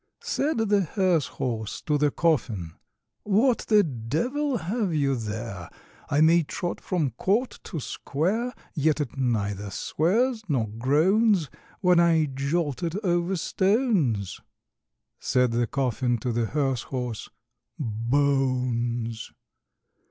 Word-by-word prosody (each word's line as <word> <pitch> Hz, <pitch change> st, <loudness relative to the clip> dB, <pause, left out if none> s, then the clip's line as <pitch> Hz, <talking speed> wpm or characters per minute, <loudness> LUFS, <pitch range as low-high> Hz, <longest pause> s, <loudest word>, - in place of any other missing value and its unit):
Said 300 Hz, +1 st, 0 dB
the 210 Hz, -3 st, +2 dB
hearse 180 Hz, -4 st, +1 dB
horse 110 Hz, -4 st, -4 dB
to 150 Hz, -, 0 dB
the 145 Hz, 0 st, +3 dB
coffin, 115 Hz, -, 0 dB, 0.5 s
"What 225 Hz, +5 st, +3 dB
the 210 Hz, -2 st, +5 dB
devil 190 Hz, -, -1 dB
have 190 Hz, 0 st, -1 dB
you 140 Hz, -2 st, +2 dB
there? 105 Hz, -5 st, -5 dB, 0.4 s
I 145 Hz, +1 st, +2 dB
may 165 Hz, +2 st, +6 dB
trot 175 Hz, +3 st, -4 dB
from 160 Hz, -8 st, -1 dB
court 205 Hz, -, 0 dB
to 165 Hz, -, -4 dB
square, 190 Hz, -, -2 dB, 0.2 s
Yet 155 Hz, -1 st, +1 dB
it 145 Hz, -5 st, -3 dB
neither 105 Hz, -6 st, -1 dB
swears 220 Hz, -, 0 dB
nor 125 Hz, -7 st, +1 dB
groans, 155 Hz, -, +2 dB, 0.3 s
When 180 Hz, -1 st, +5 dB
I 165 Hz, -2 st, +4 dB
jolt 140 Hz, +1 st, -1 dB
it 170 Hz, 0 st, -2 dB
over 175 Hz, 0 st, +1 dB
stones." 190 Hz, -, +1 dB, 0.8 s
Said 125 Hz, -1 st, +2 dB
the 120 Hz, 0 st, +1 dB
coffin 125 Hz, -2 st, 0 dB
to 120 Hz, +2 st, -3 dB
the 115 Hz, 0 st, 0 dB
hearse 135 Hz, -2 st, 0 dB
horse, 125 Hz, -3 st, -5 dB, 0.5 s
"Bones!" 120 Hz, -2 st, 0 dB
145 Hz, 120 wpm, -26 LUFS, 120-185 Hz, 0.8 s, may